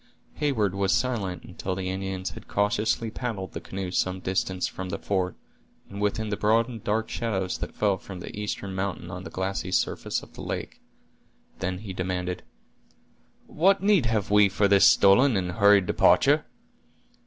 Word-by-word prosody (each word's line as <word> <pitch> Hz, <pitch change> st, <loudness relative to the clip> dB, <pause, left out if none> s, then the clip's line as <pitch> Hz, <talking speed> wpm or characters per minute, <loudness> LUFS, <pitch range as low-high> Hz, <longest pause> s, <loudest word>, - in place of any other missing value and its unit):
Heyward 120 Hz, -10 st, +1 dB
was 100 Hz, 0 st, +1 dB
silent 110 Hz, -8 st, -1 dB
until 95 Hz, -1 st, -5 dB
the 95 Hz, 0 st, -3 dB
Indians 95 Hz, -1 st, -4 dB
had -, -, -12 dB
cautiously 110 Hz, +3 st, 0 dB
paddled 110 Hz, -6 st, -4 dB
the -, -, -6 dB
canoe 95 Hz, -1 st, -5 dB
some 95 Hz, 0 st, 0 dB
distance 95 Hz, 0 st, -1 dB
from 95 Hz, 0 st, -6 dB
the -, -, -3 dB
fort, 95 Hz, -3 st, -1 dB, 0.6 s
and 100 Hz, +1 st, -6 dB
within 105 Hz, +1 st, 0 dB
the 100 Hz, -, -2 dB
broad 115 Hz, +2 st, +3 dB
and 115 Hz, -4 st, -8 dB
dark 110 Hz, +2 st, 0 dB
shadows 95 Hz, -6 st, -2 dB
that -, -, -6 dB
fell 100 Hz, -3 st, +1 dB
from 95 Hz, -2 st, -9 dB
the -, -, -8 dB
eastern 105 Hz, -2 st, -4 dB
mountain 95 Hz, -1 st, -3 dB
on -, -, -7 dB
the -, -, -6 dB
glassy 95 Hz, 0 st, -3 dB
surface -, -, -1 dB
of -, -, -15 dB
the -, -, -9 dB
lake; -, -, -5 dB, 0.8 s
then 95 Hz, 0 st, -2 dB
he 100 Hz, 0 st, -7 dB
demanded: 90 Hz, -1 st, -3 dB, 1.0 s
"What 195 Hz, +4 st, +2 dB
need 200 Hz, -, +4 dB
have 110 Hz, -3 st, -1 dB
we 105 Hz, -1 st, +6 dB
for 100 Hz, +1 st, +2 dB
this 100 Hz, -1 st, +6 dB
stolen 100 Hz, +5 st, +5 dB
and 90 Hz, -2 st, -1 dB
hurried 100 Hz, +1 st, +5 dB
departure?" -, -, +4 dB
100 Hz, 170 wpm, -26 LUFS, 95-110 Hz, 1.0 s, we